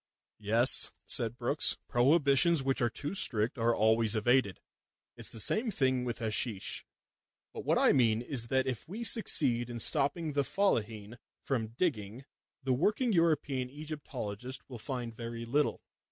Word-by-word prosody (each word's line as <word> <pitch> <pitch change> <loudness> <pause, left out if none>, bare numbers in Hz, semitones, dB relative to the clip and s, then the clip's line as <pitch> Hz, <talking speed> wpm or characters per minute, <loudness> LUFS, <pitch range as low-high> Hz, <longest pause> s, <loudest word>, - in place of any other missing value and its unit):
"Yes," 115 +4 +2
said 115 0 +1
Brookes. 125 +5 +1
"Prohibitions 140 +4 +3
which 135 0 -1
are 120 - +2
too 145 +8 -5
strict 125 - +3
are 115 0 +2
always 110 0 +2
evaded. 115 -2 +1 0.6
It's - - -1
the 115 - -3
same 220 - +3
thing 130 -8 0
with 120 -1 -4
hasheesh. 110 -2 -3 0.7
But - - -8
what - - +2
I - - +4
mean 115 -4 +2
is 120 -3 0
that 130 +2 +1
if 125 -4 -4
we 210 +8 -6
succeed 135 - +1
in 120 - -6
stopping 150 +7 +1
the 140 - +1
Fellaheen 115 - -2 0.2
from 115 -4 -3
digging, 120 - -2 0.4
the 130 -1 +1
working 215 - +1
European 150 -7 0
Egyptologist 130 -5 -6
will 125 -4 -9
find 120 -1 -4
very 115 0 -6
little. 145 +5 -1
125 Hz, 150 wpm, -31 LUFS, 115-145 Hz, 0.7 s, I